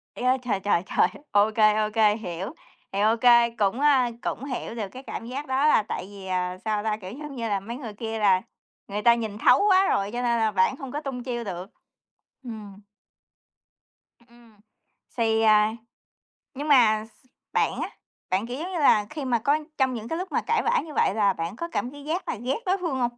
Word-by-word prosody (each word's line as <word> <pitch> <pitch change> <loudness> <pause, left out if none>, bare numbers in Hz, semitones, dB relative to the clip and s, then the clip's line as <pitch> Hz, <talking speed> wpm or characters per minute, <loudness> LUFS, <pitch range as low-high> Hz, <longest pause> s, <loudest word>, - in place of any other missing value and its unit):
Trời - - -5
ơi, 255 +1 +4
trời, 210 -6 -1
trời, 190 -3 +1
trời! - - +3 0.2
OK, 210 +1 +3
OK, 215 0 +3
hiểu, 190 - -5 0.4
thì 195 - -2
OK, 225 +2 +2 0.4
cũng, 210 +4 +1
a, 270 -4 +4
cũng 270 - -3
hiểu 250 -3 -5
được 215 -4 -3
cái 260 +2 -10
cảm 230 - -6
giác 280 +4 -5
đó 270 +3 +2
là 220 - +4
tại 205 - -5
vì, 195 -2 -10
ờ, 180 0 -2
sao 210 -1 0
ta, 215 -1 -1
kiểu, 185 -3 -9
giống 285 +3 -8
như 230 -2 -3
là 200 -1 0
mấy 230 +5 -7
người 230 -7 -7
kia 225 +1 -5
là 190 -3 +4 0.5
người 205 +1 -3
ta 235 +1 +6
nhìn 220 -3 -4
thấu 250 +3 +5
quá 380 0 +5
rồi 200 +1 0
cho 245 +2 -3
nên 235 -1 +1
là 220 -1 +2
bạn 190 +6 +2
không 270 -2 -8
có 295 - -4
tung 260 -4 -5
chiêu 240 -2 -3
được. 185 -1 -6 0.7
Ừm. 210 -4 -9 1.5
Ừm. 235 -3 -21 0.6
Xì, 225 -1 +2
à 215 0 +4 0.8
nhưng 290 +3 -5
mà 220 -7 +5
s 220 +2 -25 0.3
bạn - - +1
á, - - -3 0.4
bạn, 195 +5 0
kiểu 245 +2 -5
giống 360 +3 -5
như 345 - -2
là, 215 -7 +4
khi 300 -3 -5
mà 240 -3 +1
có 285 +7 +2 0.2
trong 260 -2 +2
những 225 -1 -6
cái 325 - -3
lúc 370 +2 -5
mà - - +1
cãi 460 - +2
vã 475 +1 +3
như 305 - -9
vậy 195 - +2
là 200 -2 +3
bạn 165 +2 -4
có 335 +8 -4
cảm 250 -4 -2
thấy 285 0 -11
ghét 325 +5 -2
là - - -2
ghét 245 - -2
đối 375 +2 +2
phương 330 -8 -2
hông? 240 0 -1
230 Hz, 220 wpm, -25 LUFS, 210-265 Hz, 1.5 s, ta